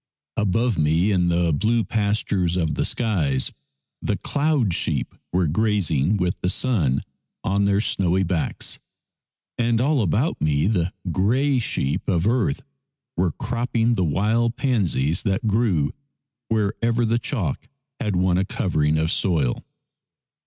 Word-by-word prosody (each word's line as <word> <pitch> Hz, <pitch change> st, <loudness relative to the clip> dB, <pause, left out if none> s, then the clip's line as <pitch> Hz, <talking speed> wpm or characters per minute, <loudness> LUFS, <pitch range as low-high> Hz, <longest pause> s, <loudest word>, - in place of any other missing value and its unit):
Above 110 Hz, +1 st, +1 dB
me 80 Hz, +6 st, +2 dB
in 90 Hz, -3 st, +2 dB
the 85 Hz, -1 st, +2 dB
blue 115 Hz, +10 st, +1 dB
pastures 100 Hz, -5 st, 0 dB
of 80 Hz, -4 st, 0 dB
the -, -, 0 dB
skies 85 Hz, -, 0 dB, 0.5 s
the -, -, -1 dB
cloud 145 Hz, -, +1 dB
sheep -, -, -1 dB, 0.2 s
were 90 Hz, 0 st, +2 dB
grazing, 95 Hz, -2 st, +1 dB
with 90 Hz, -2 st, 0 dB
the 90 Hz, -, 0 dB
sun 90 Hz, -, +1 dB, 0.4 s
on 100 Hz, +1 st, +1 dB
their 100 Hz, 0 st, +2 dB
snowy 95 Hz, -2 st, +1 dB
backs, 85 Hz, -3 st, -1 dB, 0.8 s
and 115 Hz, -1 st, +2 dB
all 140 Hz, +1 st, +2 dB
about 110 Hz, -, 0 dB
me 75 Hz, 0 st, +2 dB
the 90 Hz, -4 st, +1 dB, 0.2 s
grey 125 Hz, -, +2 dB
sheep 70 Hz, -, -1 dB
of 85 Hz, -3 st, +1 dB
earth 125 Hz, +5 st, +1 dB, 0.5 s
were 90 Hz, -3 st, 0 dB
cropping 120 Hz, 0 st, 0 dB
the 95 Hz, -, 0 dB
wild 110 Hz, +9 st, +1 dB
pansies 95 Hz, -, +1 dB
that 100 Hz, +4 st, -1 dB
grew 105 Hz, -9 st, +1 dB, 0.5 s
wherever 115 Hz, +2 st, 0 dB
the 115 Hz, +1 st, +1 dB
chalk 105 Hz, -, -3 dB, 0.3 s
had 105 Hz, -7 st, -1 dB
won 90 Hz, 0 st, +2 dB
a -, -, +2 dB
covering 75 Hz, -6 st, 0 dB
of 80 Hz, +1 st, 0 dB
soil. 80 Hz, -10 st, 0 dB
100 Hz, 135 wpm, -23 LUFS, 85-115 Hz, 0.8 s, me